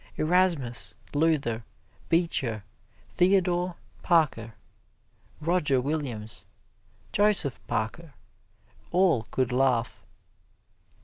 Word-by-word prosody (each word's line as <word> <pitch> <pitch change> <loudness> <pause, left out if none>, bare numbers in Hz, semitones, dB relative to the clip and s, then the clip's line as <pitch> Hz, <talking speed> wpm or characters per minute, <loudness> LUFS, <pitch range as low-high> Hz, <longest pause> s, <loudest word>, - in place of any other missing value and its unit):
Erasmus, 155 - +1 0.2
Luther, 145 -7 +1 0.5
Beecher, 135 - +1 0.5
Theodore 180 -1 +2 0.3
Parker, 140 - +1 0.8
Roger 155 -4 +2
Williams, 125 -6 -4 0.6
Joseph 205 -10 +2
Parker 140 +8 -3 0.7
all 175 - +2
could 130 -1 0
laugh. 125 -2 +1
150 Hz, 65 wpm, -27 LUFS, 120-175 Hz, 0.8 s, Theodore